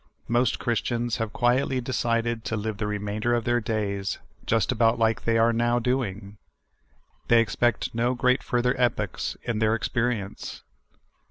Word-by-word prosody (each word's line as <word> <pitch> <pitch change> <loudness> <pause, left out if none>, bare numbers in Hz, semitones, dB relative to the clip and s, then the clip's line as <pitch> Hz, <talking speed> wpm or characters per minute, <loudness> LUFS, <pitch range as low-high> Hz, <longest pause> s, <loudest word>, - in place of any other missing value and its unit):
Most 120 +2 +2
Christians 120 0 -1
have 115 -3 -2
quietly 125 +3 +1
decided 120 -2 -1
to 110 - -2
live 110 0 -3
the 105 0 -2
re 105 0 -1
mainder 105 +4 -1
of 115 - -2
their 120 0 +1
days 100 -3 -2 0.3
just 115 +1 +2
about 115 -1 +3
like 115 -1 +1
they 115 0 +3
are 115 +1 +4
now 120 +1 +2
doing. 110 -5 -2 0.9
They 120 - +6
expect 115 0 +1
no 120 +2 +1 0.3
further 125 0 +1
great - - -10
epochs 105 -6 -1
in 115 -2 -2
their 110 0 +3
experience. 115 -3 -3
115 Hz, 155 wpm, -26 LUFS, 110-120 Hz, 0.9 s, They